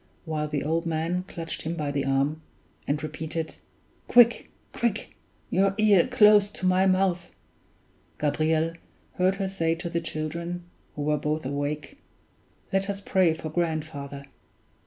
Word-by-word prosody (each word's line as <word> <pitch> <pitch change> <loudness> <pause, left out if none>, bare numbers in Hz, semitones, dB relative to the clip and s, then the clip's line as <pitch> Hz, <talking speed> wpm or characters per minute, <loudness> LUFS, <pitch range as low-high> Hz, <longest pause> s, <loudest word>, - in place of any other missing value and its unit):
While 155 -2 -2
the 145 -2 -2
old 165 +3 0
man 165 +3 -1
clutched 165 -3 -5
him 165 +2 -3
by 150 -3 -2
the 140 -1 -1
arm, 140 +3 +1 0.5
and 150 +2 -1
repeated, 160 +1 -4 0.5
"Quick! 240 -1 +5 0.2
quick! 230 -3 -2 0.4
your 195 +1 +3
ear 210 -5 +5
close 210 -5 +6
to 190 - -6
my 185 +1 +4
mouth," 185 -2 +1 0.9
Gabriel 155 +2 +1 0.4
heard 185 +1 +3
her 195 -1 -2
say 165 -4 0
to 170 0 -6
the 170 -1 0
children 170 +2 -4 0.3
(who 145 - -3
were 150 0 +1
both 150 0 -2
awake), 145 - -3 0.7
"Let 195 +1 +1
us 200 0 -2
pray 185 -4 +2
for 160 -1 -6
grandfather." 155 -4 -3
165 Hz, 140 wpm, -26 LUFS, 150-190 Hz, 0.9 s, close